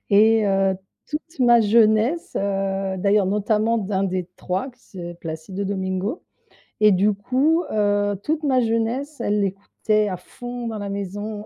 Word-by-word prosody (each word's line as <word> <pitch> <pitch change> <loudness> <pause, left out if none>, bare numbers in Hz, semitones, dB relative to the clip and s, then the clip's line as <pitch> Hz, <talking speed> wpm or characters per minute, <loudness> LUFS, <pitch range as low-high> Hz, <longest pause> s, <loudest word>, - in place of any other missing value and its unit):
et 220 +1 +5
heu, 195 -1 +2 0.3
toute 315 +2 -6
ma 240 -2 +6
jeunesse, 220 +8 +3
heu, 195 -1 -1
d'ailleurs, 200 +1 +3
notamment 215 +3 +1
d'un 195 -2 -1
des 185 -2 -2
3 190 +9 -3
qui 250 0 -29 0.2
s 175 -1 -6
Placido 165 +5 -5
Domingo 190 - -3 0.6
et 215 0 +7
du 200 +2 +3
coup, 270 - +1
heu, 205 -1 +1
toute 310 +1 -1
ma 260 -3 +3
jeunesse 235 +5 -1
elle 210 -2 +1
l'écoutait 205 +2 0
à 185 - -3
fond 245 +6 -8
dans 220 -2 -4
la 200 0 -4
maison, 205 +2 -5
210 Hz, 150 wpm, -22 LUFS, 195-230 Hz, 0.6 s, et